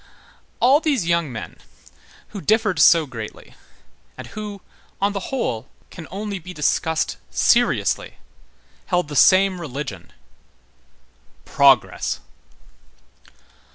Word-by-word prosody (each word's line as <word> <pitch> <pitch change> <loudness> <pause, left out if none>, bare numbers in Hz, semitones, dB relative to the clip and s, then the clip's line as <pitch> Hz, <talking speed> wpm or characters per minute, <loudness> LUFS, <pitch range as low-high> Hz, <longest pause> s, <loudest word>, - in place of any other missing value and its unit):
All 265 +4 +5
these 285 - 0
young 170 -4 0
men 110 - -8 0.7
who 200 - -8
differed 210 -5 +1
so 165 0 +6
greatly, 115 -5 -9 0.6
and - - -8
who, 210 -2 -8 0.4
on 200 +1 +1
the 195 -2 -5
whole, 130 - -3 0.2
can 165 -3 -10
only 200 0 -5
be 180 +1 -10
discussed 155 +2 0
seriously, - - +1 0.7
held 175 -4 0
the 145 - -6
same 185 +3 +4
religion: 130 - -7 1.3
Progress. - - +3
180 Hz, 100 wpm, -21 LUFS, 150-205 Hz, 1.3 s, so